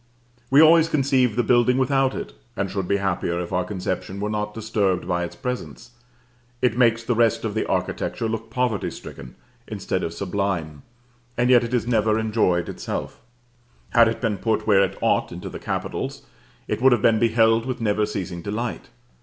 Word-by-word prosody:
We 140 +4 +7
always 165 0 +6
conceive 130 -6 +2
the 120 - +2
building 125 +2 +3
without 135 0 +2
it, - - -6 0.2
and 95 -1 -2
should 95 -2 -3
be 100 - +2
happier 90 -3 -1
if 90 -1 -5
our 90 - +1
conception 95 0 -4
were 105 +1 -2
not 105 0 -3
disturbed 105 -5 -1
by 90 -1 0
its 85 0 -6
presence. 125 +3 -6 0.7
It 125 -3 +1
makes 115 -2 +3
the 120 - 0
rest 115 -1 +2
of - - -2
the - - -1
architecture 115 - -2
look 115 0 -4
poverty 120 -3 -1
stricken, 65 - -10 0.3
instead - - -3
of 80 - -3
sublime; 90 -5 -3 0.6
and 125 +2 +3
yet 120 -1 +6
it 115 - -4
is 120 - 0
never 110 -2 +2
enjoyed 105 -6 +1
itself. - - -5 0.7
Had 115 -1 +6
it 115 - -2
been 110 -5 -1
put, 110 +1 0
where 100 -3 +5
it 95 - -3
ought, - - +1
into - - -7
the - - -8
capitals, - - -4 0.4
it - - -2
would 130 0 +6
have 120 - 0
been 110 -1 +4
beheld 115 0 +3
with 130 - -3
never 105 -1 +1
ceasing 90 -4 -5
delight. 115 +8 -4
110 Hz, 185 wpm, -23 LUFS, 95-120 Hz, 0.7 s, We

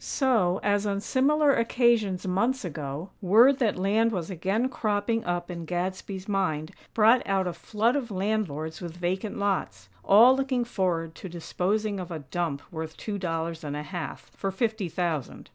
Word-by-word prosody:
So, 220 -10 +2
as 205 0 +1
on 200 -1 0
similar 280 +6 +3
occasions 230 -6 +2
months 235 +7 0
ago, 150 +2 -5
word 230 +8 +6
that 225 -8 +1
land 215 +5 +2
was 180 -4 -3
again 195 +7 0
cropping 225 -2 -1
up 175 0 -2
in 170 -1 -5
Gadsby's 185 +2 -4
mind, 160 -7 -1 0.2
brought 225 +3 +6
out 195 -1 +1
a 180 - -2
flood 220 - 0
of 265 -5 -2
landlords 185 -6 -2
with 170 -1 -7
vacant 185 +4 -2
lots, 185 - -2
all 235 +6 +7
looking 265 -2 0
forward 175 -7 -1
to 185 - -9
disposing 200 +5 -1
of 180 -1 -6
a 165 - -4
dump 145 0 -3
worth 160 -1 -6
two 205 -2 -4
dollars 165 -1 -3
and 145 -1 -4
a 150 - -4
half, 175 0 -6
for 195 - -2
fifty 215 -1 -1
thousand. 165 -5 -3
190 Hz, 165 wpm, -27 LUFS, 170-220 Hz, 0.2 s, all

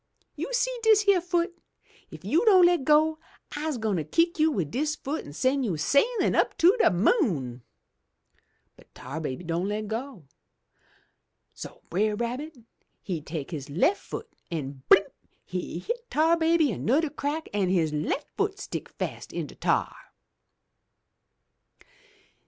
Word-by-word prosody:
You - - -5
see - - 0
dis 435 -2 +4
yere 390 -3 +5
foot? 345 0 -1 0.5
If - - -12
you 335 +7 +2
don' 375 -5 +7
le' 350 0 +4
go, 310 +3 +3 0.4
I'se 300 -2 -2
gwine 210 -7 -1
kick 330 - +1
you 315 +1 +4
wid 175 - -2
dis 300 - -1
foot 300 +1 -4
an' 145 - -11
sen' 260 - +1
you 190 -9 -1
sailin' 280 - +2
up - - +1
to 355 +6 +5
de - - +5
moon!' 175 - +1 1.1
But - - -22
Tar 140 +6 -6
baby 140 +1 -4
don' 170 +2 -2
le' 210 +1 -2
go! 220 - -6 1.3
So - - -10
Brer 210 +4 +1
Rabbit 255 +7 -4 0.5
he 175 -5 -3
take 150 0 -6
his 145 -5 -6
left 195 - +2
foot - - -7 0.2
an' 140 -5 -5
blimp! 195 +1 +5 0.3
he 180 -2 -4
hit 475 - -5
Tar 320 +3 +3
Baby 325 -3 +3
anudder 285 +9 +1
crack, 305 +3 -3
an' 200 -3 +1
his 165 -5 +1
left 155 - -2
foot 405 -1 -1
stick - - -6
fast - - -6
in - - -3
de - - -12
tar! - - 0
265 Hz, 150 wpm, -27 LUFS, -, 1.3 s, don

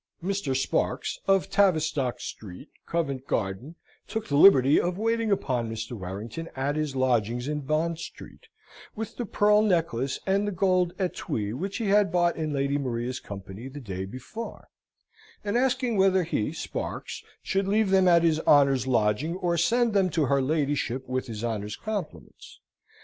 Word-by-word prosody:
Mr. 190 -8 -1
Sparks, 135 - -1
of 195 -1 +2
Tavistock 155 - +2
Street, 100 - -9 0.2
Covent 140 -6 -2
Garden, 110 - -2 0.3
took 220 -1 -4
the 140 - -1
liberty 140 -4 +7
of 180 +1 -2
waiting 225 0 0
upon 125 - 0
Mr. 115 +1 -5
Warrington 110 - -6
at 135 +2 -1
his 155 -3 -2
lodgings 120 -1 +1
in 150 0 -1
Bond 155 +4 -1
Street, - - -10 0.5
with 225 0 -6
the 240 - -3
pearl 210 +1 +4
necklace 165 - 0
and 200 +2 +1
the - - -1
gold 185 -2 +1
etwee 110 - -2
which 190 +10 -4
he 225 -4 -1
had 205 0 +4
bought 175 -1 +2
in 155 -1 -2
Lady 140 0 0
Maria's 125 -1 -3
company 100 +4 -8
the 140 +2 -8
day 95 -7 -5
before; 130 - -8 0.7
and 205 +1 -2
asking 250 -2 +1
whether 190 -1 +4
he, 155 -10 -1
Sparks, - - -5 0.2
should 195 0 0
leave 205 0 +2
them 190 -1 +5
at 170 -1 +5
his 160 -2 +3
honour's 135 -4 +4
lodging, 120 +7 +1
or 175 -2 0
send 230 +7 +2
them 195 -2 +3
to 160 -3 +1
her 140 +1 +2
ladyship 140 -3 -1
with 130 +1 -2
his 110 -1 -6
honour's 105 -3 -3
compliments? 210 -6 -7
155 Hz, 160 wpm, -27 LUFS, 130-195 Hz, 0.7 s, liberty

